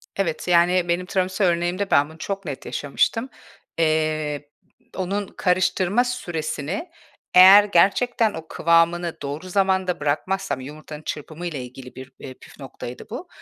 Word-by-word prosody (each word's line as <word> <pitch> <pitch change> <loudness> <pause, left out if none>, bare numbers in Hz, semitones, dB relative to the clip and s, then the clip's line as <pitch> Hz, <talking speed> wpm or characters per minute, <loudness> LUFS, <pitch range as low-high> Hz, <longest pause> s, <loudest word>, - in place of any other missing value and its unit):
Evet, 175 -5 -2
yani, 175 0 +3
benim 175 +1 0
tiramisu 185 +1 -1
örneğimde 175 +3 0
ben, 140 +1 +4
bunu 160 - -14
çok 195 +3 -5
net 140 -4 -6
yaşamıştım. 145 - -1 0.5
Eee, 155 -2 0 0.5
onun 195 +2 -2
karıştırma 185 +5 +1
süresini 180 - -4 0.4
eğer 190 +3 +9
gerçekten 210 +4 +2
o 160 0 -8
kıvamını 170 +1 +2
doğru 145 +6 -6
zamanda 190 -2 +1
bırakmazsam 150 +3 -1
yumurtanın 150 +2 -9
çırpımı 155 +3 -6
ile 145 -7 -5
ilgili 125 +1 -11
bir, 130 0 -10
iii, 130 - -8
püf - - -16
noktaydı 125 -2 -9
bu, - - -7
175 Hz, 135 wpm, -23 LUFS, 150-190 Hz, 0.5 s, eğer